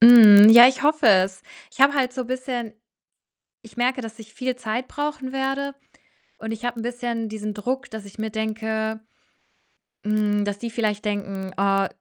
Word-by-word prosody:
Mhm, 220 -3 +9
ja, 240 +2 +9
ich 260 +2 -4
hoffe 305 -4 +3
es. 190 -1 +2 0.3
Ich - - -12
habe 280 +1 +6
halt 260 -3 0
so 255 0 -5
bisschen 255 -2 -5 0.9
ich 225 +2 -18
merke, 255 +2 0
dass 225 -1 -9
ich 220 -1 -14
viel 255 -1 -3
Zeit 245 +1 -4
brauchen 290 -3 -5
werde 270 +1 -3 0.6
und 220 0 -7
ich 225 +2 -7
habe 245 -1 -4
'n - - -6
bisschen 240 -2 -4
diesen 215 -1 -6
Druck, 260 +6 -4
dass 220 -2 -9
ich 200 +2 -15
mir 220 0 -3
denke 220 0 -4 1.1
hm, 210 -1 0
dass 205 0 -4
die 235 - -5
vielleicht 215 -3 -3
denken: 195 -2 -5
„Oh, 195 0 +1
225 Hz, 175 wpm, -22 LUFS, 210-255 Hz, 1.1 s, Mhm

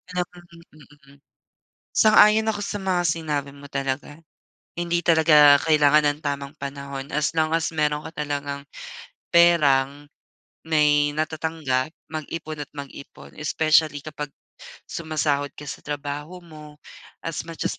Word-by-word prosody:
Ah, 180 - +1
mm, 175 -1 -17 0.5
mm. 140 - -20 0.8
Sang-ayon 215 0 +6
ako 215 -2 -1
sa 205 - -3
mga 190 -3 0
sinabi 155 -4 -2
mo 140 0 -14
talaga. 135 +2 -4 0.6
Hindi 175 0 0
talaga 155 -4 +6
kailangan 150 -1 +4
ng 145 - -14
tamang 140 -1 -4
panahon 140 0 -6
as 150 -1 0
lang 160 -1 +1
as 165 0 -2
meron 150 -1 0
ka - - -8
talagang 140 -1 -5 0.7
perang, 145 -5 +4 0.6
may 150 -2 +3
natatanggap, 155 -3 -2 0.2
mag-ipon 155 -1 -6
at - - -19
mag-ipon. 140 -1 -11
Especially 155 -1 +2
kapag 150 -1 -7 0.6
sumasahod 150 -3 -1
ka 150 - -10
sa - - -10
trabaho 150 +4 -5
mo, 150 -3 -14 0.4
as 165 0 -5
much 165 -1 -7
as - - -2
150 Hz, 130 wpm, -23 LUFS, 145-165 Hz, 0.8 s, Sang-ayon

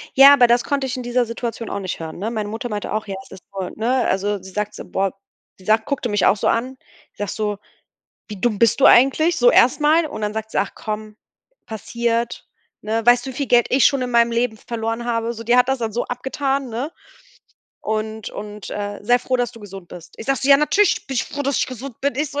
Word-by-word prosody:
Ja, 275 +1 +9
aber 250 -4 +6
das 240 +1 +3
konnte 280 -2 -1
ich 260 +1 -4
in 250 - -5
dieser 245 0 +1
Situation 230 0 -5
auch 200 - -3
nicht 185 -2 -5
hören, 160 0 -7
ne? 210 +4 -2
Meine 215 -3 -3
Mutter 225 +3 -5
meinte 210 -2 -4
auch: 215 0 -2
„Ja, 195 - -4
das - - -18
ist - - -47
toll,“ 190 -2 -5
ne? 245 +3 +1
Also 200 +1 -1
sie 190 +1 -11
sagt 210 +2 -3
so - - -8
boah 195 0 -1 0.5
sie 185 - -18
sagt 220 +1 +2
guckte 275 -4 -2
mich 205 -2 +1
auch 210 - +4
so - - -1
an. 255 +3 0 0.4
Sagt 205 -1 -4
so: 210 -2 -2 0.7
„Wie 210 -3 -9
dumm 225 -2 0
bist 230 +3 +3
du - - +7
eigentlich?" 310 +7 +5
so 245 -3 +5
erst 250 - +4
mal. 310 +2 +4
Und 220 - -7
dann 210 0 -2
sagt 220 0 -4
sie - - -1
„Ach 195 - 0
komm, 215 0 -6 0.5
passiert, 235 +2 -3 0.3
ne? 220 +2 -2
Weißt 245 +1 +5
du, - - -4
wie - - -10
viel 280 - -2
Geld 240 -2 +4
ich 260 0 +5
schon 275 -2 +1
in 250 - -3
meinem 235 -1 +3
Leben 235 -1 0
verloren 230 +1 -4
habe?“ 230 -1 -1
So, 230 -1 -9
die 240 +2 +3
hat 250 0 +4
das 265 0 +1
dann 225 -2 -3
so 240 - -1
abgetan, 270 +2 -2
ne, 245 +6 -4 0.9
und 220 0 -3
und, 210 -1 -8
äh: 205 0 -4
„Sei 245 +4 +3
froh, 255 +1 -1
dass 245 -1 -1
du 230 - -13
gesund 195 -3 -10
bist. 170 -1 -12
Ich 225 - -8
sage 275 0 +1
so: 270 - 0
„Ja 275 - +9
natürlich, 380 +6 +2
bin 270 - -5
ich 240 - 0
froh, 285 - -7
dass 280 -1 0
ich - - +1
gesund 255 0 -8
bin.“ 280 +1 0
Ich 295 +1 -2
so:„ 290 - -3
235 Hz, 250 wpm, -21 LUFS, 210-255 Hz, 0.9 s, Ja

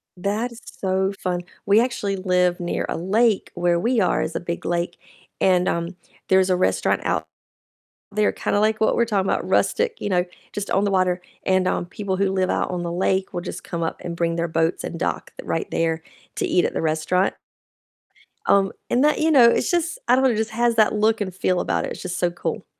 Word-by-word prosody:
That 205 +6 -2
is 235 - -12
so 190 0 -1
fun, 180 -1 -1 0.2
we 205 +2 +5
actually 210 -5 -1
live 180 -1 +1
near 175 -1 -2
a - - -2
lake 210 +4 +1
where 175 -1 +1
we 235 +6 +1
are 185 - +2
is 160 - -3
a - - 0
big 170 0 -5
lake, 175 0 -1 0.4
and, 185 -1 +3
um, 170 +2 -2 0.3
there's 190 0 +4
a 185 - +3
restaurant 185 - +1
out - - 0 0.8
there, 210 0 +2
kinda 205 - -1
like 215 +1 +1
what 220 - +3
we're 235 - +3
talking 200 -4 0
about, - - -1
rustic, 465 -1 +1
you - - -2
know, 180 -1 +2 0.3
just 205 -1 -5
on 195 - +2
the 200 - +1
water, 185 -1 +1 0.2
and, 185 -1 +2
um, - - 0
people 190 +1 -4
who 195 0 +1
live 185 -1 0
out - - 0
on 175 -1 -3
the 170 - -3
lake 190 +2 0
will 175 - -3
just - - -7
come 170 -2 -4
up 165 - -3
and 170 -1 -4
bring 170 -1 0
their 170 0 -1
boats 165 +1 0
and 170 - -5
dock - - -2
th - - -10
right 165 - -2
there 165 0 0 0.3
to - - -1
eat 180 - +2
at - - -2
the - - -2
restaurant. 160 +4 +1 1.1
Um, 195 -1 +3 0.2
and 250 - +2
that, 300 0 +3
you 320 +1 +3
know, 265 -6 +7
it's - - +1
just 345 +5 0
I - - +6
don't 265 - +2
know, 265 - +5
it 235 - +1
just 220 0 -1
has 235 +1 +1
that 215 -1 +4
look 215 +1 +2
and 190 -3 -3
feel 185 0 0
about - - 0
it, - - -6
it's - - -7
just 180 -1 -4
so 175 -1 +1
cool. 175 - -4
190 Hz, 230 wpm, -23 LUFS, 175-215 Hz, 1.1 s, know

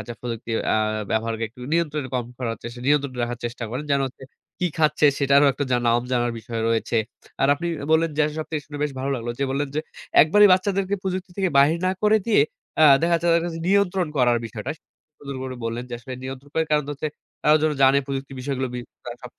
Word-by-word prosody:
রাখা 120 - -7
প্রযুক্তির 115 -1 -3 0.2
আ - - +3 0.3
ব্যবহারকে 115 0 -1
একটু 120 +3 -17
নিয়ন্ত্রণে 155 -5 0
কম 125 - 0
করার 115 -3 -3
চেষ্টা 120 +1 -8
নিয়ন্ত্রণে 140 -3 +1
রাখার 120 0 -3
চেষ্টা 120 0 -4
করেন, 130 +5 -4
যেন 140 0 +3
হচ্ছে 130 +1 -11 0.4
কি 180 - +1
খাচ্ছে 150 -1 +3
সেটারও 140 +1 +5
একটা 145 - -2
জানা 120 -1 +2
নাম 120 +1 +3
জানার 120 -1 +1
বিষয় 115 +1 -5
রয়েছে। 115 0 0 0.5
আর 135 - +4
আপনি 170 +4 -5 0.3
বললেন 165 +1 +3
যে - - +5 0.2
সব 155 - -3
থেকে 155 -2 -2
শুনে 145 0 -8
বেশ 150 -1 -1
ভালো 135 +1 -2
লাগলো। 120 -2 -4
যে 140 - +1
বললেন 140 +2 -1
যে 155 - +1 0.4
একবারই 205 +7 +6
বাচ্চাদেরকে 195 +1 +1
প্রযুক্তি 185 0 -3
থেকে 195 -2 +1
বাহির 150 +4 +5
না - - +3
করে 215 +1 +5
দিয়ে 225 -8 +4 0.4
আ - - +7 0.2
দেখা 170 +1 +1
যাচ্ছে 170 +1 0
তাদের 165 0 +3
কাছে 165 -1 -5
নিয়ন্ত্রণ 195 -2 +2
করার 120 -2 +3
বিষয়টা। 115 +4 -6 0.5
সুন্দর 140 -1 -7
করে 130 -1 -5
বললেন 115 +2 -3
যে - - -11
আসলে 130 +2 -8
নিয়ন্ত্রণ 135 +2 -8
করার 160 -1 0
কারণটা 150 -1 +1
হচ্ছে 155 +2 -3 0.4
আ - - +2
তারাও 155 - +6
যেন 155 -1 +2
জানে 135 +1 +6
প্রযুক্তি 135 0 -4
বিষয়গুলো 130 -1 -2
বি - - -3 0.3
তারা 120 -1 -6
সব 125 - -9
140 Hz, 220 wpm, -23 LUFS, 120-160 Hz, 0.5 s, আ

